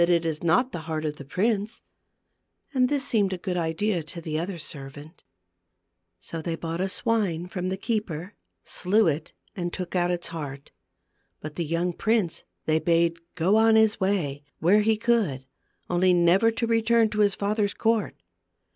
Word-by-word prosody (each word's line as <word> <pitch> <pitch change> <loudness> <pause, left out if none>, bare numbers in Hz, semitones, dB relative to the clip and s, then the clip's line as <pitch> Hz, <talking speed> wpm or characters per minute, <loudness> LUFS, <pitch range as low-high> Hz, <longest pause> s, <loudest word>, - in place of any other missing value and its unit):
263 170 0 +4
it 165 -1 -1
is 150 - -11
not 180 +11 +3
the - - -4
heart 155 -1 -2
of 150 -1 -3
the - - -8
prince," 205 - -1 0.9
and 255 -2 +3
this 280 -1 +1
seemed 205 -6 +2
a - - -3
good 180 0 -3
idea 175 +3 0
to 160 +2 -7
the 155 -2 -3
other 175 +2 -4
servant. 145 +1 -9 1.0
So 165 - -6
they 165 +1 -2
bought 165 +1 -4
a 190 - 0
swine 195 -6 0
from 180 0 -4
the 190 - -2
keeper, 200 -4 -3 0.3
slew 205 +5 +1
it, 155 0 -1 0.2
and 175 -2 -3
took 180 0 -5
out 175 -1 +2
its 175 -1 -2
heart. 145 -4 -7 0.7
But 155 0 -7
the 170 +1 -3
young 170 +3 -1
prince 215 -4 0 0.2
they 155 0 +2
bade 170 0 +2 0.2
go 185 +5 +3
On 225 0 +5
his 220 -1 +4
way, 180 -8 0 0.2
where 195 +6 +4
he 220 0 +2
would; 190 - +2 0.4
only 180 +1 +3
never 175 +6 +4
to 230 +1 -1
return 230 0 +3
to 210 0 -4
his 205 -1 +3
father's 205 0 0
court. 225 -1 +1
180 Hz, 175 wpm, -26 LUFS, 165-215 Hz, 1.0 s, On